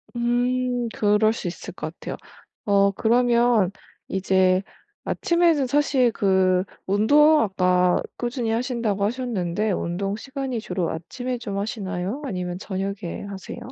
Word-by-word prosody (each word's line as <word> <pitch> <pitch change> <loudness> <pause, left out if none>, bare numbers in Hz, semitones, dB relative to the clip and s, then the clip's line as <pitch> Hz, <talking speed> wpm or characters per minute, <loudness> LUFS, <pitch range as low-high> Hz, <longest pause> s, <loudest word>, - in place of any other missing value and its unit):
음 245 0 0
그럴 210 +1 +3
수 195 - -5
있을 175 - -7
것 - - -5
같아요. - - -6 0.5
어 200 -1 +4
그러면 235 -2 +3 0.4
이제 190 -1 +2 0.4
아침에는 340 -5 +2
사실 275 -3 +2
그 190 -3 +2 0.2
운동 295 +10 +5
아까 180 -3 +2 0.2
꾸준히 240 -1 -2
하신다고 230 -4 -1
하셨는데 215 -4 -1
운동 195 +3 -2
시간이 265 +1 -4
주로 180 -6 -2
아침에 245 +10 -5
좀 200 -4 -5
하시나요? 200 +3 -3
아니면 180 -6 -4
저녁에 195 -2 -4
하세요? 195 +2 -8
215 Hz, 270 characters per minute, -24 LUFS, 190-245 Hz, 0.5 s, 운동